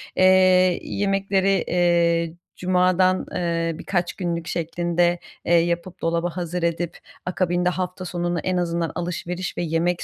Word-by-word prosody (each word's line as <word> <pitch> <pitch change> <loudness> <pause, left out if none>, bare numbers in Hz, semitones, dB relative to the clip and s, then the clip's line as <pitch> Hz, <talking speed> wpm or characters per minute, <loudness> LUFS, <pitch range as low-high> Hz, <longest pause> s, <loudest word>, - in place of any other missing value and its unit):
eee, 185 -1 +5
yemekleri, 195 -1 +1
eee, 170 -2 +2 0.2
cumadan, 185 0 +2
eee, 165 -1 -1
birkaç 175 -3 -1
günlük 170 -2 -3
şeklinde, 175 +1 0 0.3
eee, 175 - +2
yapıp 170 +1 +1
dolaba 170 +1 0
hazır 175 0 -3
edip 170 0 -1 0.3
akabinde 180 0 +1
hafta 180 0 -4
sonunu 175 -1 -2
en 185 +1 -1
azından 170 -2 -1
alışveriş 175 +1 -4
ve - - -1
yemek 170 +2 0
175 Hz, 125 wpm, -23 LUFS, 170-185 Hz, 0.3 s, eee